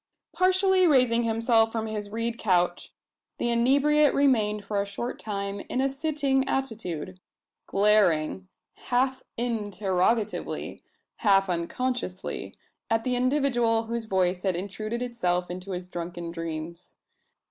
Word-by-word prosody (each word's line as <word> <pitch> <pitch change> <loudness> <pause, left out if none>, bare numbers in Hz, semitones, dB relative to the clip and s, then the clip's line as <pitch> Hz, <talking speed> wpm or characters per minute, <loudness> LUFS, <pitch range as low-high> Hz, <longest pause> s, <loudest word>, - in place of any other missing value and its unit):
Partially 370 0 +3
raising 250 -6 +4
himself 225 0 +2
from 225 -1 -2
his 210 -2 -4
reed 230 +2 -2
couch, 180 -3 +1 0.5
the 240 - 0
inebriate 280 +5 +4
remained 215 -7 +2
for 205 -2 0
a - - 0
short 235 +5 -5
time 200 -1 -4
in 250 - -1
a 270 - +3
sitting 280 -2 0
attitude 185 - -3 0.5
glaring, 190 -4 +2 0.4
half 260 +1 +1 0.2
interrogatively, 210 -2 -1 0.4
half 195 -3 +3
unconsciously, 185 +3 -3 0.3
at 225 0 +1
the 255 -1 0
individual 245 -3 +2
whose 230 0 -4
voice 185 -3 +1
had 190 -2 0
intruded 215 +6 -4
itself 180 -8 -1
into 185 +2 -7
his 180 -1 -4
drunken 175 -1 -6
dreams. 165 0 -6
220 Hz, 120 wpm, -26 LUFS, 185-250 Hz, 0.5 s, raising